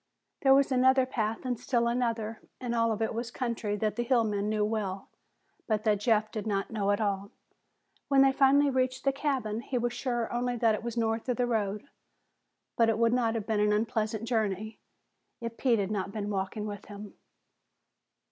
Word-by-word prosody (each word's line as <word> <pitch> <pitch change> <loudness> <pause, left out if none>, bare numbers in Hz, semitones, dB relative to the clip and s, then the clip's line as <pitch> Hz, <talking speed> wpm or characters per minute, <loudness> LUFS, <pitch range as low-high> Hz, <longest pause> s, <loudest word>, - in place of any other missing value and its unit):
There 270 -2 +6
was 275 0 +3
another 260 0 +4
path, 225 -2 -2
and 245 -3 -2
still 235 -1 +1
another, 230 -2 -1 0.2
and 245 -2 -3
all 230 -1 +2
of 220 +1 -1
it 220 - -1
was 230 +1 -3
country 235 -4 -2
that 215 +1 -1
the 240 - +1
hill 240 -1 +3
men 205 -1 -1
knew 215 -1 +1
well 205 -3 -3 0.6
but 215 -2 0
that 210 -2 +2
Jeff 215 0 +2
did 215 0 -4
not 195 -2 -1
know 205 -3 -1
at 205 - +2
all. 200 -2 -1 0.8
When 275 -1 +5
they 270 - +5
finally 275 +1 +4
reached 255 0 0
the 275 - +2
cabin, 260 -6 -1
he 250 - -3
was 240 0 -1
sure 240 -3 -2
only 245 0 -1
that 230 -2 +3
it 210 - -2
was 235 0 -5
north 225 +1 -1
of 250 - 0
the 250 - +2
road. 210 -3 -1 0.9
But 230 -1 +4
it 220 - +1
would 230 0 +3
not 230 -2 +1
have 220 -3 -3
been 220 -2 0
an 210 0 +3
unpleasant 220 0 -1
journey 220 -2 -1 0.6
if 230 -2 -5
Pete 245 -2 +2
had 200 -1 -1
not 195 -2 -2
been 210 -1 -4
walking 195 +2 -3
with 205 -1 -6
him. 205 0 -10
225 Hz, 200 wpm, -29 LUFS, 210-245 Hz, 0.9 s, There